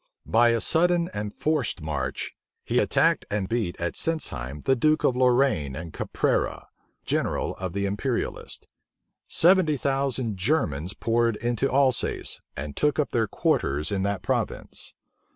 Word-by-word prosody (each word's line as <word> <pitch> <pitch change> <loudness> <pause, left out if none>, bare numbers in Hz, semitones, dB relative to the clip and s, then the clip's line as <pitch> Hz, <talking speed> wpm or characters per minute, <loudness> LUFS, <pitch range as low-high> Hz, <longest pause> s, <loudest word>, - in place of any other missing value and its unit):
By 120 +1 +4
a 115 -1 +1
sudden 175 +1 +3
and 105 0 -3
forced 150 -8 -1
march, 70 -4 -3 0.3
he - - +1
attacked - - +2
and 100 -2 -1
beat 110 -6 -2
at 85 0 -2
Sintzheim 75 - -3
the 135 - +4
duke 155 +5 +2
of 125 - +3
Lorraine 125 - +2
and 80 +2 -7
Caprara, - - -1 0.4
general - - -1
of 95 -2 -4
the 100 0 -1
imperialists. 105 +6 -3 0.6
Seventy 170 -4 +4
thousand 135 -5 -1
Germans 95 - 0
poured 115 0 +1
into 120 +4 -1
Alsace, 130 -1 +1 0.2
and 75 -1 -5
took 150 -1 +1
up 150 - 0
their 115 -2 +1
quarters 75 -4 0
in 100 -1 0
that 100 0 -1
province. - - -3
115 Hz, 140 wpm, -26 LUFS, 90-140 Hz, 0.6 s, By